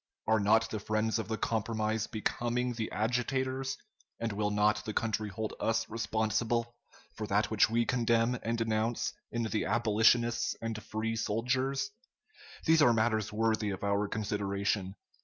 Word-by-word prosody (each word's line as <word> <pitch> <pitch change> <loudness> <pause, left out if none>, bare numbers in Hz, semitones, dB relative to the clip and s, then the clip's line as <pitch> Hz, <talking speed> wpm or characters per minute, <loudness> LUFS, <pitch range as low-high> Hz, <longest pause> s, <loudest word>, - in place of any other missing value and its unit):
Are 110 0 +3
not 110 +2 +4
the 110 - -2
friends 110 +2 0
of 110 - -3
the 110 0 -2
compromise 110 0 -1
becoming 120 +3 -1
the 115 -2 -4
agitators, 130 +3 -1 0.4
and 115 -1 -1
will 105 0 0
not 105 +1 +2
the 110 - -5
country 110 -1 -1
hold 110 +2 -4
us 115 0 0
responsible 115 +1 -1 0.4
for - - -5
that - - +1
which - - +4
we 115 +1 +2
condemn 120 0 +2
and 115 +1 -1
denounce 115 +1 0 0.2
in 120 0 -1
the 110 -1 -1
abolitionists 115 +1 +3
and 115 -1 -4
Free 110 +2 -3
soldiers? 130 - 0 0.7
These 160 -1 +5
are 120 -5 +6
matters 110 -1 +1
worthy 110 -1 +1
of 95 -1 -5
our 100 0 +1
consideration. 100 -2 -1
110 Hz, 150 wpm, -31 LUFS, 110-120 Hz, 0.7 s, are